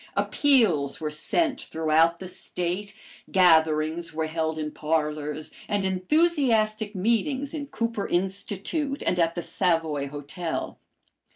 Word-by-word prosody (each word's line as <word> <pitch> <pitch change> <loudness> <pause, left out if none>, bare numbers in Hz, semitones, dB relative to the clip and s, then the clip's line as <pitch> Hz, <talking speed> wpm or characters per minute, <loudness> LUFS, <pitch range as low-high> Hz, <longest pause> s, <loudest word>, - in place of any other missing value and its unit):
Appeals 210 - +2
were 155 -1 -3
sent 275 - 0
throughout 160 +1 +2
the 185 - -8
State, 180 +2 -3 0.4
gatherings 160 -2 +3
were 160 0 0
held 160 0 -2
in 150 -1 -3
parlors, 150 -1 -2 0.2
and 205 -2 0
enthusiastic 220 - +1
meetings 260 - 0
in 290 -3 -4
Cooper 230 -4 -2
Institute 200 - -2
and 180 - +1
at 165 0 +2
the 175 - -3
Savoy 160 -6 0
Hotel. 150 +4 -5
180 Hz, 115 wpm, -26 LUFS, 160-220 Hz, 0.4 s, gatherings